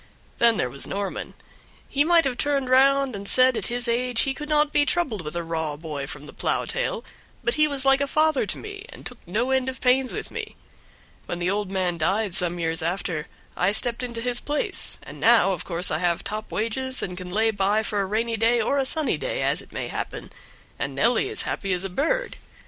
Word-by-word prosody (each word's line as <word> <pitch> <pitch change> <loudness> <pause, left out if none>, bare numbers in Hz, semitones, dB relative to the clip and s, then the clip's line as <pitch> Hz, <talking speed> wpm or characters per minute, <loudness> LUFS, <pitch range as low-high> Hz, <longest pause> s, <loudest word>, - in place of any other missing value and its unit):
Then 230 -2 +5
there - - 0
was 135 +3 -4
Norman; 200 0 -4 0.5
he 285 - +2
might 335 0 +4
have 265 -2 0
turned 275 0 0
round 270 -1 +4
and 200 0 -7
said 255 +2 +4
at - - -2
his 245 0 -1
age 240 0 +1
he 270 - +1
could 300 +1 -7
not 300 -1 +2
be 290 - +4
troubled 275 - -1
with 150 0 -6
a 170 - -2
raw 160 -2 -3
boy 150 -3 -5
from 150 0 -8
the - - -12
plow - - -1
tail, - - -2 0.4
but 240 0 +1
he 305 +1 +3
was 280 -2 -1
like 270 0 +4
a 280 - +1
father 310 -5 +2
to - - 0
me, 410 0 -9
and - - -12
took 250 - -6
no 230 +9 -1
end 260 0 +1
of 260 - -7
pains 255 0 +3
with 435 - -5
me. - - -6 0.7
When 175 - -3
the 175 +1 0
old 205 -1 -2
man 185 -3 -1
died 195 +4 0
some 175 -2 +5
years 165 -1 0
after 170 -2 -2 0.3
I 180 +2 +2
stepped 235 +2 +3
into 235 -2 -4
his 245 0 0
place, 295 +3 -1
and - - -11
now 225 -4 +5
of 175 - -5
course 175 0 -1
I 155 - 0
have 175 -1 0
top 215 +1 -3
wages, 255 +4 +2
and 180 - -4
can 180 0 -7
lay 220 +4 +2
by 205 +1 +1
for 205 -2 -1
a - - 0
rainy 225 +3 -1
day 230 +2 +3
or 275 +5 +1
a 265 - +2
sunny 310 +1 +1
day, - - -2
as - - +1
it - - -17
may - - -4
happen, - - -6 0.5
and - - -3
Nelly - - +2
is - - -1
as - - -3
happy 195 -2 -2
as 180 +1 -2
a 195 - -3
bird. 330 - -1
230 Hz, 235 wpm, -24 LUFS, 185-270 Hz, 0.7 s, Then